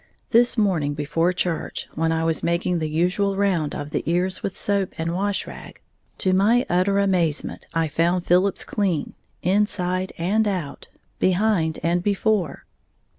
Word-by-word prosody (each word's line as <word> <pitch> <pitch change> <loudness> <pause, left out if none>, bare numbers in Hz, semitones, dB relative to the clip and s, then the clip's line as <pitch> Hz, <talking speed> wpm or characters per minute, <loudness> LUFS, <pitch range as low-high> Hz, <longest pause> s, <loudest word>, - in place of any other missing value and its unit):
This 240 +1 +4
morning 170 -9 +1
before 165 +4 0
church, 175 -2 -3
when 160 +1 0
I 165 0 0
was 165 -1 0
making 170 +1 0
the 155 -1 -2
usual 180 +5 0
round 185 -7 0
of 145 0 -6
the - - -1
ears 180 +2 0
with 195 - -4
soap 200 -2 0
and 165 +1 -2
wash 200 +2 -1
rag, - - -11 0.4
to 185 - +1
my 220 +6 +3
utter 185 +3 +2
amazement 180 -6 0
I 165 -1 +2
found 170 +4 0
Philip's 185 +3 +2
clean, 185 -7 -1 0.3
inside 185 -1 0
and 210 +6 +1
out, 180 -8 -4 0.3
behind 185 -4 +2
and 170 +2 +1
before. 200 -4 0
180 Hz, 150 wpm, -23 LUFS, 165-200 Hz, 0.4 s, This